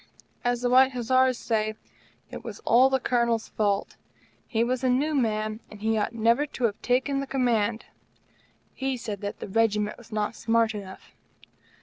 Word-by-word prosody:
As 245 Hz, 0 st, 0 dB
the 245 Hz, -, +2 dB
White 260 Hz, +1 st, +6 dB
Hussars 255 Hz, +1 st, +2 dB
say, 215 Hz, -2 st, -1 dB, 0.6 s
it -, -, -8 dB
was -, -, -7 dB
all 255 Hz, +3 st, +5 dB
the 265 Hz, 0 st, +1 dB
Colonel's 235 Hz, -3 st, 0 dB
fault. 205 Hz, -2 st, -1 dB, 0.5 s
He 225 Hz, -2 st, +1 dB
was 255 Hz, +2 st, -1 dB
a 260 Hz, -, +3 dB
new 285 Hz, +5 st, +1 dB
man, 215 Hz, -4 st, 0 dB
and 210 Hz, -, -12 dB
he 220 Hz, +1 st, 0 dB
ought 210 Hz, -, 0 dB
never 235 Hz, +6 st, +2 dB
to 260 Hz, -, -7 dB
have 210 Hz, -3 st, 0 dB
taken 260 Hz, +3 st, +1 dB
the 275 Hz, -, -4 dB
Command. 235 Hz, -4 st, 0 dB, 0.9 s
He 265 Hz, -1 st, -2 dB
said 210 Hz, -4 st, -6 dB
that 205 Hz, 0 st, -5 dB
the -, -, -6 dB
Regiment 210 Hz, 0 st, +1 dB
was 235 Hz, -, -16 dB
not 210 Hz, 0 st, -1 dB
smart 230 Hz, 0 st, +1 dB
enough. 195 Hz, -3 st, -9 dB
230 Hz, 170 wpm, -26 LUFS, 215-255 Hz, 0.9 s, White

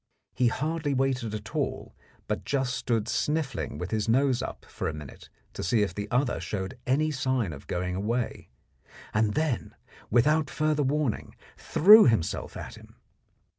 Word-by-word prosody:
He 125 Hz, -1 st, +2 dB
hardly 150 Hz, +2 st, -1 dB
waited 125 Hz, -4 st, 0 dB
at 105 Hz, -1 st, -8 dB
all, -, -, -3 dB, 0.3 s
but -, -, -2 dB
just 135 Hz, -3 st, -1 dB
stood 115 Hz, -3 st, -1 dB
sniffling 150 Hz, -1 st, -1 dB
with 90 Hz, -, -5 dB
his 110 Hz, 0 st, -1 dB
nose 130 Hz, +1 st, +3 dB
up -, -, -6 dB
for -, -, -4 dB
a 80 Hz, -, -3 dB
minute 75 Hz, -3 st, -11 dB, 0.2 s
to -, -, -5 dB
see 105 Hz, +5 st, +2 dB
if 100 Hz, -, -2 dB
the 105 Hz, 0 st, -5 dB
other 125 Hz, +1 st, +1 dB
showed 105 Hz, +5 st, -4 dB
any 150 Hz, +4 st, +2 dB
sign 130 Hz, -, -1 dB
of 70 Hz, -, -11 dB
going 90 Hz, +1 st, -2 dB
away, 115 Hz, +5 st, -2 dB, 0.6 s
and 110 Hz, -1 st, +1 dB
then, 155 Hz, -6 st, -1 dB, 0.3 s
without 150 Hz, +6 st, +3 dB
further 155 Hz, -1 st, 0 dB
warning, 140 Hz, -3 st, -1 dB, 0.2 s
threw 210 Hz, +6 st, +7 dB
himself 110 Hz, -9 st, 0 dB
at -, -, -7 dB
him. -, -, -17 dB
125 Hz, 160 wpm, -27 LUFS, 105-145 Hz, 0.6 s, threw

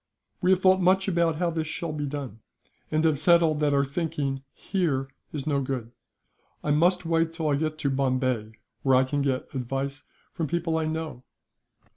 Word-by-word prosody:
"We 180 Hz, -, +2 dB
have 190 Hz, -1 st, +5 dB
thought 190 Hz, 0 st, +5 dB
much 190 Hz, +2 st, +4 dB
how 170 Hz, -2 st, +1 dB
this 160 Hz, -1 st, -2 dB
shall 165 Hz, +1 st, -3 dB
be 145 Hz, -1 st, -3 dB
done, 135 Hz, -6 st, -5 dB, 0.5 s
and 155 Hz, +1 st, +1 dB
have 155 Hz, -3 st, +3 dB
settled 165 Hz, -2 st, +4 dB
that 150 Hz, -1 st, +2 dB
our 140 Hz, 0 st, +3 dB
thinking, 140 Hz, -2 st, -2 dB
here, 150 Hz, -9 st, -1 dB, 0.2 s
is 145 Hz, -3 st, -4 dB
no 145 Hz, -3 st, +1 dB
good. 130 Hz, -3 st, -3 dB, 0.7 s
I 150 Hz, -, 0 dB
must 175 Hz, +4 st, +3 dB
wait 165 Hz, 0 st, +2 dB
till 160 Hz, -2 st, -1 dB
I 145 Hz, -, +3 dB
get 155 Hz, +1 st, -1 dB
to 150 Hz, -3 st, 0 dB
Bombay, 130 Hz, -4 st, 0 dB, 0.3 s
where 135 Hz, -1 st, +4 dB
I 130 Hz, -, +5 dB
can 145 Hz, +2 st, -1 dB
get 135 Hz, -2 st, -1 dB
advice 135 Hz, +2 st, -3 dB, 0.3 s
from 165 Hz, -3 st, -2 dB
people 170 Hz, +1 st, -1 dB
I 160 Hz, -, -1 dB
know." 155 Hz, -4 st, -4 dB
150 Hz, 180 wpm, -26 LUFS, 135-165 Hz, 0.7 s, have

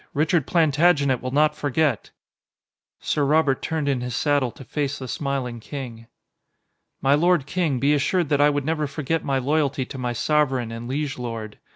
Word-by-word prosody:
Richard 155 Hz, 0 st, +1 dB
Plantagenet 150 Hz, -4 st, +3 dB
will 130 Hz, -, -3 dB
not 150 Hz, +3 st, +2 dB
forget." 145 Hz, +1 st, 0 dB, 0.9 s
Sir 150 Hz, -, 0 dB
Robert 145 Hz, -1 st, +2 dB
turned 160 Hz, -3 st, -2 dB
in 135 Hz, -3 st, 0 dB
his 125 Hz, -1 st, -4 dB
saddle 145 Hz, -2 st, +1 dB
to -, -, -12 dB
face 140 Hz, +2 st, -3 dB
the 130 Hz, -, -7 dB
smiling 130 Hz, -3 st, -3 dB
king. 115 Hz, -3 st, -8 dB, 1.0 s
"My 135 Hz, +1 st, +4 dB
lord 170 Hz, -1 st, +3 dB
king, 160 Hz, -3 st, 0 dB
be 140 Hz, +3 st, +3 dB
assured 155 Hz, +3 st, +1 dB
that 145 Hz, -1 st, +2 dB
I 145 Hz, -, +6 dB
would 145 Hz, -2 st, -1 dB
never 155 Hz, -1 st, 0 dB
forget 150 Hz, +3 st, -2 dB
my 135 Hz, -1 st, 0 dB
loyalty 140 Hz, 0 st, 0 dB
to 135 Hz, -, -8 dB
my 125 Hz, -1 st, -2 dB
sovereign 130 Hz, -2 st, +1 dB
and 115 Hz, +1 st, -6 dB
liege 140 Hz, +1 st, -3 dB
lord. 115 Hz, -3 st, -6 dB
140 Hz, 175 wpm, -23 LUFS, 130-150 Hz, 1.0 s, I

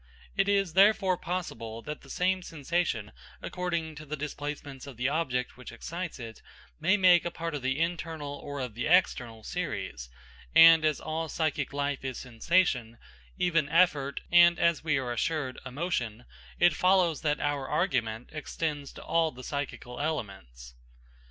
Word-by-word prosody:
It 200 Hz, -, +2 dB
is 195 Hz, -4 st, +2 dB
therefore 195 Hz, -1 st, +5 dB
possible 115 Hz, -12 st, -5 dB
that 150 Hz, -, -6 dB
the -, -, -16 dB
same 185 Hz, +1 st, +1 dB
sensation, 165 Hz, -, -2 dB, 0.3 s
according 170 Hz, -3 st, -3 dB
to 150 Hz, -, -8 dB
the 155 Hz, -, -3 dB
displacements 145 Hz, -2 st, -6 dB
of 135 Hz, -4 st, -10 dB
the 125 Hz, +2 st, 0 dB
object 130 Hz, -6 st, -1 dB
which 125 Hz, -, -10 dB
excites 170 Hz, +8 st, -6 dB
it, 115 Hz, -3 st, -9 dB, 0.4 s
may 185 Hz, +6 st, +3 dB
make 175 Hz, -3 st, +5 dB
part 165 Hz, -1 st, -4 dB
of 145 Hz, -, -3 dB
the 130 Hz, +1 st, 0 dB
internal 165 Hz, -3 st, -2 dB
or 145 Hz, -1 st, -6 dB
of 125 Hz, -4 st, -4 dB
the 120 Hz, +7 st, -3 dB
external 125 Hz, -10 st, +2 dB
series; 100 Hz, -, -4 dB, 0.5 s
and 165 Hz, -1 st, +9 dB
as 155 Hz, -2 st, +2 dB
all 160 Hz, +1 st, -3 dB
psychic 155 Hz, -2 st, -1 dB
life 140 Hz, -1 st, -2 dB
is 130 Hz, -2 st, -4 dB
sensation, 125 Hz, -2 st, +1 dB, 0.4 s
even 165 Hz, -5 st, +1 dB
effort, 150 Hz, -5 st, +2 dB
and, 175 Hz, 0 st, +7 dB
as 170 Hz, -2 st, +2 dB
we 155 Hz, -3 st, +1 dB
are 130 Hz, -2 st, -2 dB
assured, 130 Hz, +2 st, -2 dB
emotion, 125 Hz, -, -3 dB, 0.3 s
it 175 Hz, -2 st, +5 dB
follows 180 Hz, -3 st, +3 dB
that 150 Hz, -1 st, 0 dB
our 145 Hz, -2 st, -1 dB
argument 115 Hz, -, -1 dB
extends 150 Hz, -2 st, -4 dB
to -, -, -10 dB
all 165 Hz, -1 st, +1 dB
the 130 Hz, 0 st, -11 dB
psychical 140 Hz, -3 st, -5 dB
elements. 95 Hz, -, -5 dB
150 Hz, 155 wpm, -29 LUFS, 125-170 Hz, 0.5 s, and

